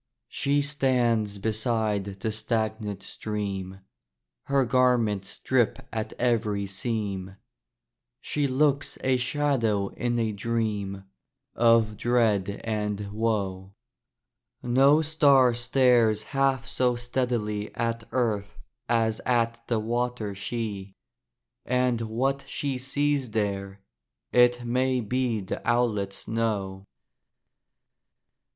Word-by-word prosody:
She 145 +1 +1
stands 120 -7 +1
beside 110 -1 0 0.2
the 110 - -1
stagnant 110 -2 -2
stream; 95 -3 -5 0.6
Her 140 -1 +2
garments 120 -5 +1
drip 125 -4 +1 0.2
at 110 0 -3
every 105 -4 0
seam; 100 -2 -3 0.8
She 145 -1 -1
looks 140 +1 +1
a 130 -1 +3
shadow 125 -7 +1
in 120 -1 -2
a 115 -2 0
dream 105 -3 -2 0.5
Of 115 -2 +3
dread 105 -5 +1
and 105 -2 -2
woe: 100 -3 -2 0.9
No 135 +5 +4
star 140 -5 +4
stares 120 -3 +3
half 135 -1 0
so 125 -1 +1
steadily 120 -4 -2
At 115 -1 -2
earth 105 -5 -1 0.3
as 115 -2 +1
at 115 -1 +1
the 115 - +1
water 120 -1 -2
she; 100 -2 -4 0.7
And 125 -2 +1
what 130 +5 -1
she 135 -3 -2
sees 140 0 0
there 100 -2 -2 0.5
it 120 0 +4
may 130 +2 +1
be 120 -1 -1
The 95 - -5
owlets 105 -5 0
know. 100 -4 -2
115 Hz, 100 wpm, -26 LUFS, 105-125 Hz, 0.9 s, No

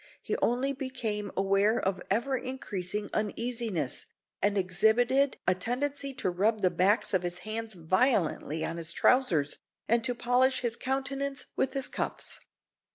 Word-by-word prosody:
He - - -2
only 255 +4 +1
became 230 -7 -3
aware 195 +4 +3
of 185 -1 -1
ever 235 +7 +1
increasing 210 -6 -4
uneasiness, 215 - -2 0.3
and 205 0 +2
exhibited 235 +9 +3
a 185 - +6
tendency 275 +8 -2
to 220 - 0
rub 210 +4 +1
the 185 - +4
backs 190 +6 +2
of 190 - +3
his 175 0 -3
hands 220 0 -4
violently 170 - +1
on 165 - -4
his 170 0 -4
trousers, 175 - +3 0.3
and 230 +1 +3
to 245 0 0
polish 250 +2 +2
his 235 -2 -1
countenance 270 +2 -2
with 265 - 0
his 270 -2 0
cuffs. - - -3
225 Hz, 145 wpm, -29 LUFS, 185-255 Hz, 0.3 s, a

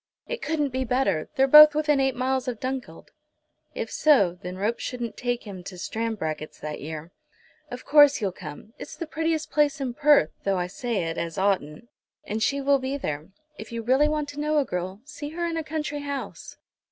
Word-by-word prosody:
"It 485 -2 -5
couldn't 300 -3 0
be 260 0 -2
better. 235 -10 0
They're 270 - +4
both 300 +2 +9
within 300 -2 +2
eight 265 -1 +1
miles 260 +1 -1
of 240 -3 -3
Dunkeld." 260 -1 -5 0.6
If - - -4
so, 200 - +3
then 180 +1 -6
ropes 210 +4 -1
shouldn't 240 -3 -4
take 245 -1 -2
him 195 -4 -9
to 185 - -8
Stranbracket's 180 -8 -4
that 150 0 -6
year. 155 +2 -7 0.6
"Of 250 0 -8
course 290 -1 +6
you'll 200 -3 -1
come. 175 +5 -10
It's - - -8
the 335 - -5
prettiest 320 0 -2
place 295 0 +2
in 260 -3 -3
Perth, 290 - +4
though 195 -1 +1
I 180 - 0
say 210 +2 -3
it, 165 0 -3
as 170 -1 -4
oughtn't. 190 -1 -1 0.4
And 215 +2 -4
she 280 +5 +1
will 280 0 +3
be 265 +2 -3
there. 155 - -4 0.3
If 220 - -9
you 230 -1 -4
really 265 +6 +4
want 300 -1 -1
to 290 - -8
know 300 +1 +1
a 290 - +3
girl, 185 +1 -4
see 295 0 -7
her 340 +2 -3
in 335 -1 -2
a 325 - -2
country 300 -1 -3
house." 285 -1 -6
255 Hz, 200 wpm, -25 LUFS, 195-295 Hz, 0.6 s, both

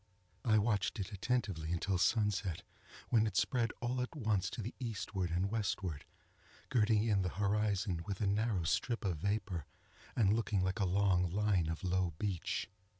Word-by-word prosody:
I 110 -2 +4
watched 105 -1 +1
it 100 +2 -3
attentively 100 -7 -1
until 90 +2 0
sunset, 105 -4 +1 0.5
when 110 -2 +4
it 100 -3 -3
spread 120 -4 +2
all 125 +1 0
at 125 +6 -4
once 110 - 0
to 115 - -5
the 115 - -5
eastward 105 -6 -2
and 90 +4 0
westward, 95 -8 -2 0.7
girting 110 -2 +3
in 100 -3 +3
the 90 - 0
horizon 100 -2 0
with 100 -2 -3
a 105 - +1
narrow 100 -2 +1
strip 115 +7 0
of 90 -5 0
vapor, 100 -4 -2 0.5
and 105 -4 +4
looking 110 -3 +1
like 95 +3 -1
a 100 - +2
long 90 -1 +3
line 100 -2 +2
of 80 +2 -4
low 90 -2 +1
beach. 95 -3 -2
100 Hz, 165 wpm, -35 LUFS, 90-110 Hz, 0.7 s, I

